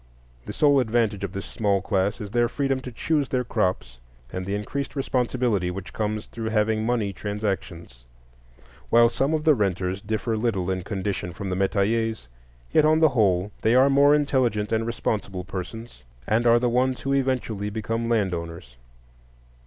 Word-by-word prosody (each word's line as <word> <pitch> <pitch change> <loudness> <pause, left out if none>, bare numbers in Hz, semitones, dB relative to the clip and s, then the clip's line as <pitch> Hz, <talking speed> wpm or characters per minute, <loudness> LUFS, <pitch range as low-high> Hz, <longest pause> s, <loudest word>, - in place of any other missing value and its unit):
The - - -3
sole 145 -2 +4
advantage 110 -4 0
of 100 - -3
this 100 -1 -5
small 100 -3 0
class 100 +1 0
is 105 -3 -7
their 120 0 +2
freedom 135 0 -1
to 125 -1 -8
choose 145 +2 0
their 125 +1 0
crops, 90 - -2 0.3
and 90 0 -4
the 100 - -1
increased 140 +9 -4
responsibility 125 -7 0
which 95 +1 -7
comes 105 0 -2
through 115 -1 -5
having 110 0 +1
money 110 -4 0
transactions. 95 - -5 0.8
While 115 0 +6
some 135 +6 0
of 155 - -2
the 155 -1 +6
renters 95 -4 -1
differ 110 +2 -2
little 105 -5 -1
in 95 0 -2
condition 95 -2 -3
from 95 +1 -5
the - - 0
metayers, 105 - 0 0.4
yet 155 - +4
on 155 +1 +4
the 160 -1 +5
whole 100 -5 +1
they 115 +2 +3
are 135 +2 +5
more 140 +1 +6
intelligent 130 -8 +1
and 115 0 0
responsible 105 -5 -2
persons, 95 - -7 0.2
and 115 +6 +2
are 115 0 +6
the 120 +1 +1
ones 125 +2 +1
who 135 - -1
eventually 125 -6 -1
become 115 +2 -3
land 105 -6 +1
owners. 85 -7 -7
110 Hz, 170 wpm, -24 LUFS, 95-125 Hz, 0.8 s, While